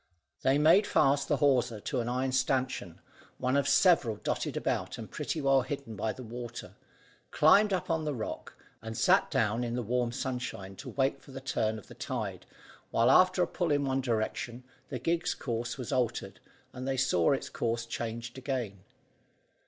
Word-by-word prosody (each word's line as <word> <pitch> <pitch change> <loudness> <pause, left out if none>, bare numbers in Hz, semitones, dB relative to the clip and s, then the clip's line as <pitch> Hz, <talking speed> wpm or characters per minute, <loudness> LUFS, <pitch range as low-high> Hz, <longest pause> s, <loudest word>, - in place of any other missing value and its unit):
They 135 +1 +3
made 165 +8 +5
fast 140 +1 +3
the 145 - +2
hawser 125 -6 +2
to 130 +5 -2
an 120 0 -2
iron 130 +2 0
stanchion, 130 -8 -1 0.4
one 130 +1 0
of 140 0 +2
several 145 - +4
dotted - - -3
about - - -2
and - - -8
pretty 160 - -3
well 135 -1 +4
hidden 130 -3 -5
by 110 +3 -1
the 130 - -9
water, 120 0 -7 0.6
climbed 200 +7 +5
up 185 - -1
on 160 -1 0
the 150 -2 -2
rock, 110 - -6 0.3
and 110 0 -6
sat - - +4
down 115 +4 +1
in 120 0 -2
the 125 - -2
warm 120 +1 0
sunshine 125 -7 -4
to - - -8
wait 135 0 0
for - - -18
the 135 - -6
turn 110 -5 -1
of 105 - -11
the - - -13
tide, - - -5 0.4
while 115 +1 +3
after 185 0 +5
a - - 0
pull 175 -2 -2
in 145 -1 +2
one 135 0 0
direction, 120 0 -2 0.3
the 130 - -3
gig's 170 +7 0
course 120 -2 -3
was 125 -4 -5
altered, 125 -3 -1 0.3
and 130 0 -6
they 135 -1 0
saw 125 -10 +3
its 135 - -1
course 115 0 -2
changed 115 +2 -5
again. 125 -7 -3
130 Hz, 185 wpm, -30 LUFS, 115-140 Hz, 0.6 s, made